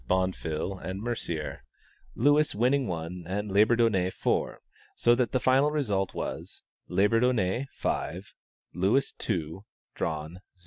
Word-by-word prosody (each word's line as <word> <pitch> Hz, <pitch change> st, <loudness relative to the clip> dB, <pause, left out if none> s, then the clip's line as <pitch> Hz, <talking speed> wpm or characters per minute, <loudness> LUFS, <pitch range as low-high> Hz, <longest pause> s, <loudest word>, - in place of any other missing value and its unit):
Bonfil 90 Hz, -1 st, -1 dB
and 95 Hz, +1 st, -5 dB
Mercier, 100 Hz, -9 st, -4 dB, 0.5 s
Lewis 145 Hz, +3 st, +3 dB
winning 125 Hz, +4 st, +2 dB
one 85 Hz, +1 st, -4 dB
and 100 Hz, +2 st, -3 dB
Labourdonnais 105 Hz, -2 st, +3 dB
four, -, -, -1 dB, 0.3 s
so 120 Hz, -, +4 dB
that 120 Hz, 0 st, +1 dB
the 130 Hz, -, +1 dB
final 135 Hz, +4 st, +4 dB
result 105 Hz, -11 st, -1 dB
was: -, -, -5 dB, 0.3 s
Labourdonnais, 115 Hz, +2 st, +2 dB
5 90 Hz, +6 st, -3 dB, 0.4 s
Lewis, 100 Hz, +9 st, +1 dB
2 85 Hz, -2 st, -3 dB, 0.3 s
Drawn, 80 Hz, -1 st, -3 dB
0. 90 Hz, +1 st, -13 dB
100 Hz, 120 wpm, -28 LUFS, 90-120 Hz, 0.5 s, so